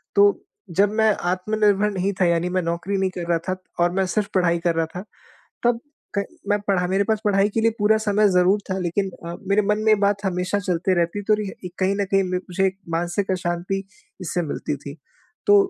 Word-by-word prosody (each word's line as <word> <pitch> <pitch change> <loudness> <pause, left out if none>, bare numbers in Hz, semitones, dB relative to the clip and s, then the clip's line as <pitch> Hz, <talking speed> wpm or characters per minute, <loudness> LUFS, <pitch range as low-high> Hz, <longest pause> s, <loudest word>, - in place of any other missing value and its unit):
तो 200 0 +7 0.5
जब 205 0 +5
मैं 220 -1 +5 0.2
आत्मनिर्भर 210 +2 +2
नहीं 195 0 -1
था - - +5
यानी 170 +1 +1
मैं 185 0 0
नौकरी 170 +4 -2
नहीं 190 -1 +1
कर 175 - -3
रहा 170 - +3
था 185 - +1 0.3
और 175 - +2
मैं 190 0 +1
सिर्फ 205 +2 0
पढ़ाई 170 -2 +3
कर 170 0 0
रहा 165 0 +1
था, 180 - -4 0.6
तब 240 -1 +3 0.4
क 200 - +1 0.2
मैं 205 0 +3
पढ़ा 180 -2 +2
मेरे 195 +2 +2
पास 220 0 0
पढ़ाई 200 -1 +3
के 225 - +2
लिए 230 - +4
पूरा 210 +1 +4
समय 210 -1 +3
ज़रूर 180 +3 +4
था 190 - 0
लेकिन 190 +3 -1 0.2
अ, 170 - -4
मेरे 200 +1 +4
मन 210 +1 +1
में 215 - 0
ये - - +8
बात 200 0 +1
हमेशा 185 +1 0
चलते 185 0 0
रहती 175 +3 0
तो 215 - +6
रिह 200 - -3
इक 180 - -6
कहीं 195 +1 +2
न - - +2
कहीं 195 - +4
म 185 0 -3 0.2
मुझे 190 +2 +1
एक 190 0 -2
मानसिक 175 +4 -1
अशाँति 175 +1 -2 0.4
इससे 175 0 -1
मिलती 145 -2 -3
थी। 140 0 -9 0.5
तो 410 - +7
190 Hz, 220 wpm, -23 LUFS, 175-205 Hz, 0.6 s, ये